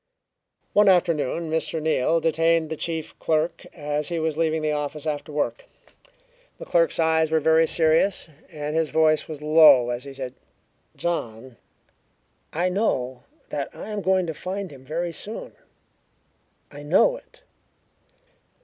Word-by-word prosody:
One 205 -1 +5
afternoon 170 -3 +1
Mr. 160 0 -1
Neal 160 +1 +1
detained 165 0 +1
the - - -1
chief 160 0 -4
clerk 160 +1 -1
as 150 -1 -3
he 170 - -2
was 160 -1 -1
leaving 160 -1 0
the 155 - +1
office 150 +1 -4
after 150 0 -3
work. 150 - -2 0.9
The - - -9
little - - -21
clerk's - - +2
eyes 160 -1 +2
were 160 0 +2
very 160 +1 +4
serious, 165 +5 +2 0.2
and 150 -1 -4
his 160 -2 +1
voice 155 -1 +2
was 150 -2 -8
low 150 -6 +6
as 120 +1 -4
he 140 -1 -9
said: 130 -2 -6 0.6
"John, 130 -7 -4 1.0
I 175 +3 0
know 130 - -1 0.2
that - - -3
I - - -8
am 210 -1 -3
going 190 -1 +2
to 160 - -4
find 190 +2 -5
him 135 -2 -13
very 165 +5 -3
soon. 210 +7 -6 1.2
I 145 0 -10
know 180 - +3
it." - - -20
160 Hz, 150 wpm, -24 LUFS, 150-170 Hz, 1.2 s, low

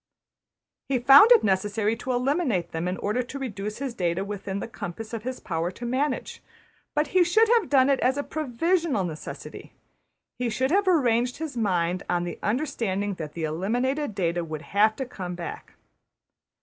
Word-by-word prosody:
He 270 - +2
found 275 - +8
it 475 - +7
necessary 210 +3 +1
to 255 - -4
eliminate 250 - 0
them 165 +2 -3
in 180 +1 -2
order 215 +5 -1
to 250 +3 -7
reduce 210 -6 -5
his 270 -2 -4
data 180 -2 -1
within 200 -1 -5
the - - -5
compass 225 -1 -7
of 230 - -3
his 255 +3 -5
power 165 0 -2
to 235 +6 -8
manage, 260 +3 -2 0.5
but 300 0 +1
he 370 -1 +4
should 435 +6 +4
have 465 - +3
done 265 -2 +5
it 275 -1 +2
as 260 +2 +2
a 285 - -1
provisional 310 - 0
necessity. 160 -3 -8 0.7
He 250 -1 0
should 260 +5 0
have 395 +2 +2
arranged 250 -8 +2
his 315 -4 -5
mind 180 -5 0
on 175 -1 +1
the 175 -2 -5
understanding 210 -5 -1
that 150 -2 -6
the 165 - -5
eliminated 230 - -1
data 175 -2 0
would 155 -1 -6
have 215 +2 +4
to 265 - -4
come 180 -7 -6
back. 175 -1 -7
230 Hz, 175 wpm, -26 LUFS, 185-275 Hz, 0.7 s, found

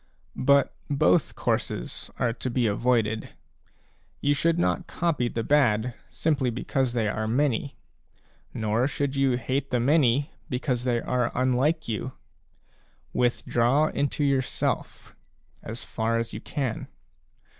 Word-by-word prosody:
But 140 0 +4
both 115 -11 +3
courses - - -2
are 120 -2 +1
to 125 +2 -4
be 120 0 +1
avoided; 110 0 0 0.8
you 145 - +2
should 165 +4 +1
not 175 +1 0
copy 150 -8 0
the 115 - -3
bad, 125 -4 +3 0.2
simply 145 -5 0
because 125 +1 -1
they 115 -3 +1
are 110 +1 -1
many, 135 +2 0 0.7
nor 110 +3 0
should 140 -1 -2
you 135 -2 +2
hate 130 +3 -2
the 125 - +1
many, 140 +1 +3 0.2
because 125 -1 -1
they 120 -2 +2
are 125 0 0
unlike 130 +6 +1
you. 120 +3 -3 1.0
Withdraw 125 +3 +2
into 145 +1 -1
yourself, 135 -3 -1 0.5
as 115 +2 -6
far 115 +1 -1
as 115 0 -3
you - - -6
can. 130 -6 -3
125 Hz, 125 wpm, -26 LUFS, 115-140 Hz, 1.0 s, But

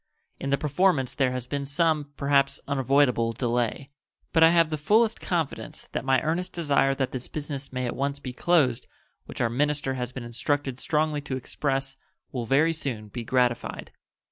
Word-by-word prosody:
In 135 - -3
the 140 - +3
performance 150 -3 +1
there 135 -3 +1
has 125 -1 -3
been 140 +2 -3
some, 150 -1 +1
perhaps 140 -1 +2
unavoidable, 135 -4 +2
delay; 120 +3 -1 0.4
but 165 - +4
I 165 - +9
have 165 -2 +3
the 155 - -1
fullest 220 +8 +3
confidence 165 -5 -3
that - - -3
my 135 -1 +3
earnest 170 +4 -1
desire 140 -4 +2
that 135 -2 -1
this 125 -1 -5
business 145 -2 -5
may 130 -1 -2
at 120 - -3
once 140 +1 -1
be 130 -3 -7
closed, 130 -5 +2 0.4
which - - -6
our 120 - +3
minister 145 +1 0
has 125 -2 -3
been 125 -2 -7
instructed 130 +3 -2
strongly 150 -1 0
to 135 -2 -4
express, 135 +1 -2 0.3
will 120 -3 -4
very 150 +6 +3
soon 120 -9 -4
be 115 +4 -5
gratified. 120 0 0
140 Hz, 175 wpm, -26 LUFS, 125-150 Hz, 0.4 s, I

